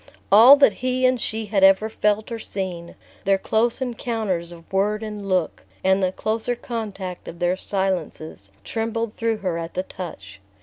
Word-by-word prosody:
All 230 +7 +10
that 280 -6 +5
he 255 0 +1
and 255 -2 +2
she 220 0 -2
had 200 -2 0
ever 195 +2 +6
felt 210 0 0
or 230 - -4
seen, 180 -5 -5 0.3
their 195 0 +3
close 230 +6 +1
encounters 220 -8 -3
of 170 +1 -14
word 210 +3 +1
and 210 -2 -6
look, 180 -4 0 0.2
and 190 +1 +3
the 185 -1 +1
closer 220 +5 -2
contact 205 -7 -6
of 170 - -8
their 175 +1 +1
silences, 180 - -3
trembled 225 - -3
through 230 -1 0
her 170 -2 -1
at 165 0 -7
the 185 - -1
touch. 100 - -9
200 Hz, 170 wpm, -23 LUFS, 180-225 Hz, 0.3 s, All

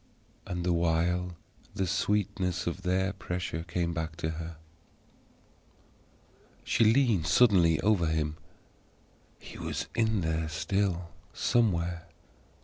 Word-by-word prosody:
And 90 -1 -3
the 90 0 +2
while 85 +2 +1 0.4
the 95 - 0
sweetness 90 -2 0
of 85 +2 -3
their 95 +1 0
pressure 90 -4 -4
came 85 0 -2
back 80 -1 -3
to 80 -1 -2
her. 80 +1 -6 2.1
She 115 - +2
leaned 110 - +3
suddenly 85 -4 +5
over 105 -6 +3
him. 80 -1 -1 1.0
HE - - -11
was - - -3
in 110 -3 +1
there 80 -1 -1
still, 90 +1 -1 0.2
somewhere. 85 -7 +1
90 Hz, 110 wpm, -29 LUFS, 80-95 Hz, 2.1 s, suddenly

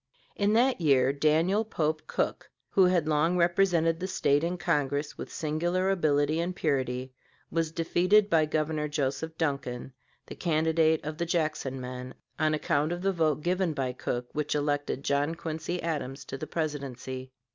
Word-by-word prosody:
In 205 +1 +2
that 245 -2 +3
year, 135 -3 +4
Daniel 160 +8 +2
Pope 155 -7 -2
Cook, - - -2 0.2
who 190 - +5
had 180 -4 +2
long 160 +3 +2
represented 170 -2 +3
the 185 - -3
State 145 -6 +2
in 175 +2 -1
Congress 145 -4 0
with - - -7
singular 175 +5 0
ability 155 -3 +2
and 175 +2 -2
purity, 130 -5 -1 0.4
was 165 -1 0
defeated 180 +5 +3
by 160 -5 +3
Governor 155 0 -1
Joseph 145 +2 -2
Duncan, 135 -5 -2 0.3
the - - -8
candidate 160 -1 +2
of 155 +1 -5
the 170 - 0
Jackson 155 -5 -1
men, 125 0 -7 0.2
on 155 0 +2
account 150 +1 0
of 175 +1 -3
the 195 - +3
vote 155 -4 +1
given 180 -1 +1
by 130 -2 -1
Cook 125 -1 -3
which 150 0 -1
elected 145 -2 -1
John 145 +3 +1
Quincy 160 +2 -4
Adams 145 -4 -3
to - - -6
the 155 - -5
Presidency. 130 -4 -4
155 Hz, 160 wpm, -28 LUFS, 145-170 Hz, 0.4 s, who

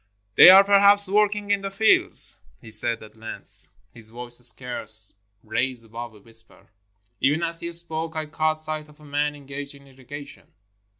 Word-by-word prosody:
"They - - +7
are 190 +1 +7
perhaps 200 0 +2
working 205 +1 -2
in 200 -1 -1
the 195 - -7
fields," 205 +3 +4 0.2
he 110 - -16
said 115 +1 +1
at 110 0 -18
length; 110 0 0 0.3
his 110 -2 -4
voice 120 +1 -3
scarce 120 -3 +4 0.3
raised 120 +2 -4
above 115 0 -11
a - - -19
whisper. 115 +2 -18 0.5
Even 145 +5 -2
as 165 0 -3
he 170 - -7
spoke, 165 -1 -7
I 155 0 -5
caught 155 +1 -4
sight 155 -1 -8
of 150 0 -23
a 150 - -19
man 145 +1 -4
engaged 140 0 -11
in 140 0 -20
irrigation. 140 +2 -15
145 Hz, 170 wpm, -21 LUFS, 120-170 Hz, 0.5 s, They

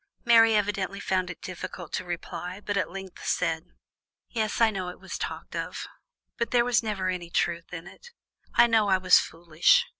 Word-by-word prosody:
Mary 225 -1 +7
evidently 200 -1 0
found 185 -2 0
it 180 - -9
difficult 180 -2 -7
to - - -1
reply, 180 +1 -5
but 205 -1 -3
at 200 - 0
length 190 0 -9
said: 165 -1 0 0.6
"Yes, 220 -3 -1
I 230 -1 +5
know 185 -3 -3
it 180 - -10
was - - -7
talked - - -5
of, - - -4 0.5
but 235 - 0
there 240 -1 +3
was 245 -1 +3
never 205 -4 -2
any 175 -2 -3
truth 170 0 -1
in 175 -1 -6
it. 195 - -13 0.5
I - - +8
know 225 -3 +3
I 190 - +5
was 185 0 +6
foolish. 170 - +3
190 Hz, 185 wpm, -27 LUFS, 180-220 Hz, 0.6 s, I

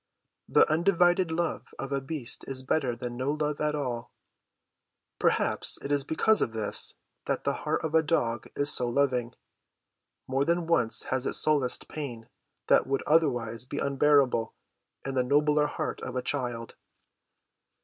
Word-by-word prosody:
The - - +5
undivided 175 +2 +3
love 165 +1 -2
of 135 - -5
a 140 0 0
beast 135 -3 -4
is 130 -1 -3
better 130 -2 0
than 120 +1 -6
no 130 +3 0
love 150 -1 -2
at 150 0 0
all. 125 -5 -4 1.1
Perhaps - - +2
it 140 - -4
is 145 -1 +3
because 215 +9 +2
of 115 - 0
this 110 -2 0 0.3
that - - -2
the - - +1 0.2
heart - - 0
of 160 - -3
a 160 - +5
dog 120 -8 0
is 145 +1 0
so 125 -1 0
loving; 125 -2 0 0.9
more 135 +1 +1
than 170 +3 0
once 165 -9 +2
has 130 0 0
it - - -1
solaced 145 -5 +1
pain 120 -7 -6 0.4
that - - +4
would 135 0 -1
otherwise 120 -8 +1
be 130 +3 -7
unbearable 140 -5 +2 0.5
in 135 - -3
the 130 - +2
nobler 150 +3 +3
heart - - -4
of 130 - -6
a 125 - -1
child. 120 -4 -2
140 Hz, 160 wpm, -28 LUFS, 125-150 Hz, 1.1 s, The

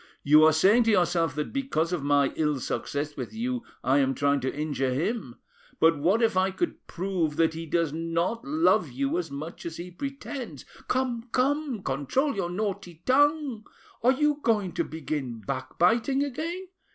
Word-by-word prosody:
You 150 +2 +6
are 160 - +7
saying 200 +9 +4
to - - +3
yourself 170 -5 +2
that 150 0 -3
because 180 - -1
of 175 - -1
my 140 -1 +2
ill 150 -3 0
success 145 +4 -3
with - - -5
you 245 +2 -2 0.2
I 135 +3 +3
am 135 -1 +1
trying 140 0 +2
to 130 0 -2
injure 145 -3 -1
him; 145 - -2 0.4
but 165 0 +5
what 190 +10 +2
if 225 -4 +2
I 190 +1 +3
could 330 - -4
prove 175 -4 -2
that 160 0 +2
he 165 +1 -6
does 165 -1 0
not 165 +7 -1
love 295 - +2
you 135 +6 -1
as 170 -3 -4
much 150 +4 -7
as 165 -1 -6
he 175 +1 -7
pretends—?" 265 - -6 0.2
"Come, 250 -2 -1
come, 270 -4 0
control 145 - 0
your 185 -3 -2
naughty 185 -3 -4
tongue! 285 -3 +2 0.4
Are 245 +4 +5
you 295 +2 +1
going 210 -7 +1
to 170 0 -1
begin 150 -7 -4
backbiting 180 - +1
again? 330 +7 -4
175 Hz, 175 wpm, -27 LUFS, 150-240 Hz, 0.4 s, are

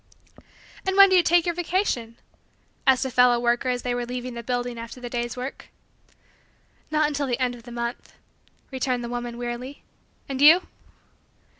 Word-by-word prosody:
"And 380 0 -1
when 395 0 +9
do 375 - +4
you 360 - +7
take 345 0 +3
your 345 - 0
vacation?" 335 - -2 0.7
asked 265 0 +4
a 265 - -3
fellow 250 -1 +4
worker 240 +2 +1
as 250 -1 -2
they 245 - -1
were 245 0 -2
leaving 250 +1 -5
the 235 - -6
building 245 0 -3
after 230 +2 -8
the 245 -1 -7
day's 240 0 -3
work. 255 +2 -6 1.2
"Not 305 0 +2
until 285 -1 -2
the 245 -2 -1
last 250 -1 0
of 240 - -11
the 240 +1 -12
month," 235 0 -5 0.6
returned 255 -2 -1
the 235 - -5
woman 240 -1 -5
wearily. 245 +3 -6 0.4
"And 270 -1 -4
you?" 325 +5 +8
250 Hz, 175 wpm, -24 LUFS, 240-285 Hz, 1.2 s, when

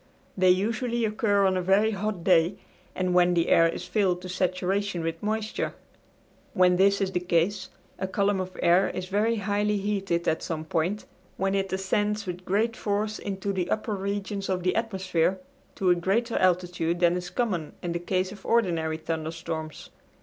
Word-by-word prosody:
They 185 -1 +4
usually 230 +5 +1
occur 210 -2 +2
on 190 -1 +2
a 185 - 0
very 195 +4 +3
hot 205 -3 -3
day, 175 0 +4 0.4
and 185 -1 0
when 180 0 +4
the 170 0 +1
air 165 0 +5
is 170 - -5
filled 180 -3 0
to 185 - -6
saturation 185 0 -1
with 165 0 -3
moisture. 215 +1 -2 0.8
When 180 -2 +4
this 200 +1 +4
is 190 -1 0
the 180 - 0
case 180 +3 0 0.3
a 190 - -1
column 200 +1 +1
of 185 0 -5
air 175 +3 +4
is 185 - -4
very 215 +4 +2
highly 205 0 0
heated 195 -4 -1
at 160 - +1
some 160 -2 -4
point, 175 +6 -1 0.3
when 195 +1 0
it 195 -1 -1
ascends 205 +3 0
with 180 0 -6
great 220 +4 +1
force 210 +1 -2
into 200 0 -3
the 180 -2 -2
upper 215 0 -1
regions 200 0 -3
of 185 -1 -1
the 185 - +1
atmosphere 190 -5 0 0.4
to 185 -2 +2
a - - +5
greater 210 +7 0
altitude 175 -2 +1
than 175 0 +4
is 180 0 -4
common 185 -11 -2
in 175 - -2
the 170 - -2
case 185 +1 -1
of 200 -1 -11
ordinary 165 -9 +1
thunderstorms. 160 0 -5
190 Hz, 180 wpm, -26 LUFS, 175-205 Hz, 0.8 s, air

